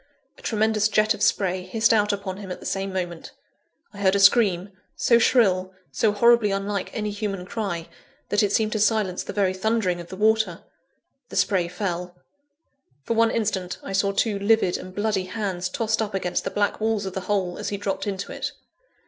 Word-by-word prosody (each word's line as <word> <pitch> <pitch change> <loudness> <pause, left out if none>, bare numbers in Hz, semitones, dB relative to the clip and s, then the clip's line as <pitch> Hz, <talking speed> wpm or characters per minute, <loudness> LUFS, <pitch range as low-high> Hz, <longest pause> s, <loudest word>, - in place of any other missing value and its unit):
A - - -17
tremendous 220 -1 +1
jet 215 +1 +3
of 210 - -9
spray 190 -3 +1
hissed 220 +5 +2
out 210 -1 +3
upon 195 -2 -4
him 195 -2 -8
at - - -5
the - - -12
same 195 0 -2
moment. 175 -3 -5 0.6
I 200 - -11
heard 195 -1 +3
a - - +2
scream, 195 -2 +4 0.3
so 235 -1 +4
shrill, 190 -6 +3 0.2
so 220 - +2
horribly 235 +1 +4
unlike 195 0 -2
any 210 -2 -2
human 200 -3 -4
cry, 185 -6 -4 0.4
that 205 - +2
it 205 -2 +1
seemed 215 0 +1
to 215 - -1
silence 205 -3 +1
the - - -6
very 195 -3 +1
thundering 190 -3 0
of 170 - -11
the 185 - -8
water. 215 -3 +1 0.7
The - - -9
spray 185 -4 +2
fell. 180 -1 -4 0.9
For 230 - -1
one 230 0 +4
instant, 200 -6 -2
I 195 - -6
saw 195 +1 +2
two 200 +1 0
livid 200 -3 +3
and 185 0 -7
bloody 205 -3 0
hands 185 -3 -3
tossed 220 +3 0
up 210 -2 -3
against 180 -2 -1
the - - 0
black 205 0 0
walls 220 -2 0
of 190 - -5
the 190 - -3
hole, 190 -4 0
as - - -3
he 200 - -3
dropped 195 0 -3
into 195 -1 -4
it. - - -4
200 Hz, 200 wpm, -24 LUFS, 185-215 Hz, 0.9 s, scream